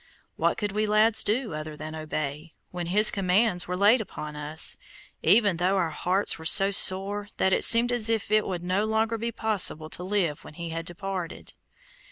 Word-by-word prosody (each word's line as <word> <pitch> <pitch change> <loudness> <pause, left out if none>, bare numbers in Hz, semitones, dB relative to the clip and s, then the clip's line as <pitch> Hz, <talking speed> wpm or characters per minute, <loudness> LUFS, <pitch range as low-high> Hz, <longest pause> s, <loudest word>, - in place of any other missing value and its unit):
What - - 0
could 205 -2 -3
we 210 +1 -1
lads 215 +1 +3
do 225 -1 -1
other 155 0 -7
than 155 +1 -8
obey, 155 0 -6 0.2
when 175 -1 -5
his 210 +4 +5
commands 190 -1 +1
were 180 0 -3
laid 210 +5 +4
upon 150 -7 -8
us, 150 +1 -2 0.4
even 200 0 +3
though 185 +3 0
our 170 -4 -1
hearts 180 +4 -1
were - - -10
so 195 +4 +5
sore 200 +1 +2
that 190 - +1
it - - +2
seemed 235 +1 +5
as 230 -2 +1
if 225 -2 -1
it 215 0 +2
would 180 -2 -5
no 185 +4 -1
longer 220 +1 -1
be 235 +1 -3
possible 200 -9 +1
to 180 - -7
live 180 -6 -2
when - - -13
he 170 0 -7
had 165 +1 -6
departed? 185 -1 -6
190 Hz, 195 wpm, -25 LUFS, 165-215 Hz, 0.4 s, his